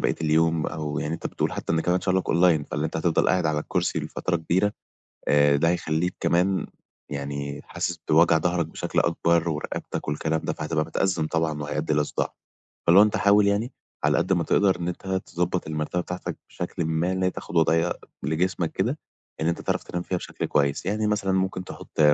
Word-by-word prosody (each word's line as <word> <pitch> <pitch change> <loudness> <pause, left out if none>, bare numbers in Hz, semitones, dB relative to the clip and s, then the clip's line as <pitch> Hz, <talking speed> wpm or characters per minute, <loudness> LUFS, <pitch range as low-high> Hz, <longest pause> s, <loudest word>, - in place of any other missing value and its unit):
بقية - - +1
اليوم 80 +1 +2
أو 75 -1 -3
يعني 80 +2 -2
أنت - - -4
بتقول - - -2
حتّى 80 0 -1
كمان 90 +1 +1
شُغلك 95 -1 0
أونلاين، 85 -4 +4
فاللي 75 +1 -3
أنت 80 - -5
هتفضل 80 0 +2
قاعد 90 -3 +2
على 75 -1 +1
الكُرسي - - -1
لفترة 90 -2 -2
كبيرة، 95 +6 +1 0.6
آآ 75 -1 +5
ده 80 +3 +2
هيخلّيك 85 0 0
كمان 95 +2 +2 0.4
يعني 70 0 -4
حاسس 90 - -3
بوجع 80 +1 +5
ضهرك 85 -1 0
بشكل - - -2
أكبر 85 0 +2
ورقبتك 75 -1 -4
والكلام 80 +2 0
ده - - 0
فهتبقى 75 0 -1
متأزّم 90 -5 0
طبعًا 80 -2 -1
وهيأدّي 75 +1 -2
إلى 75 0 +2
صُداع. - - -3 0.5
فاللي 85 +4 +8
هو 105 - +9
أنت 105 - 0
حاول 100 0 +5
يعني 110 +5 0 0.3
على - - +3
قد 95 - +1
ما 85 -2 +2
تقدر 95 +4 +3
إن 85 - -2
أنت 90 +2 -6 0.2
تضبّط 90 0 -1
المرتبة 80 +3 -2
بتاعتك 90 +1 -5
بشكلٍ 85 - -4
ما 80 +3 0
إن 95 0 -2
هي 90 - +3
تاخُد 85 - -7
وضيعية 80 +1 +3 0.3
لجسمك 85 +3 0
كده - - -1 0.4
إن 80 - 0
أنت 85 - -1
تعرف - - -1
تنام 90 0 -4
فيها 90 0 -2
بشكل - - -5
كويس. 70 0 +1
يعني 105 +2 0
مثلًا 105 -2 +1
ممكن 95 -1 0
تحُط - - -7
85 Hz, 190 wpm, -25 LUFS, 80-90 Hz, 0.6 s, هو